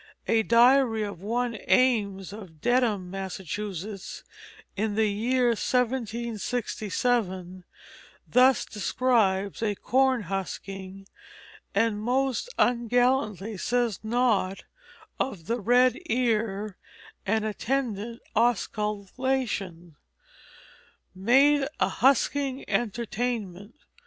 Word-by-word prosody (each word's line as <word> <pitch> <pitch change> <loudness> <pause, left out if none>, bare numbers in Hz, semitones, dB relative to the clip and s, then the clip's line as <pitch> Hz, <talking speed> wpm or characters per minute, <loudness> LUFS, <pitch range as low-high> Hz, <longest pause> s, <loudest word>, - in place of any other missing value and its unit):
A 225 -1 +3
diary 235 0 +4
of 200 -4 -6
one 235 +2 -2
Ames, 205 -7 +2
of 190 -7 -11
Dedham, 225 -5 +1
Massachusetts, 195 +1 -6 0.5
in 210 0 -1
the 220 0 +3
year 245 +4 +1
1767, 230 -5 -1 0.6
thus 255 +1 +4
describes 205 -3 0
a 210 -2 0
corn 260 +1 +2
husking, 195 +1 -6 0.7
and 220 -2 +1
most 260 - 0
ungallantly 240 -3 +1
says 240 -1 0
naught 220 -4 0 0.6
of 190 -11 -3
the 235 +6 -1
red 245 +3 +3
ear 215 -5 0 0.5
and 220 +2 +1
attendant 230 0 -3
osculation: 210 - -1 1.2
"Made 270 +9 +4
a - - +2
husking 275 +1 +1
Entertainm't. 225 -3 -3
220 Hz, 80 wpm, -27 LUFS, 195-245 Hz, 1.2 s, diary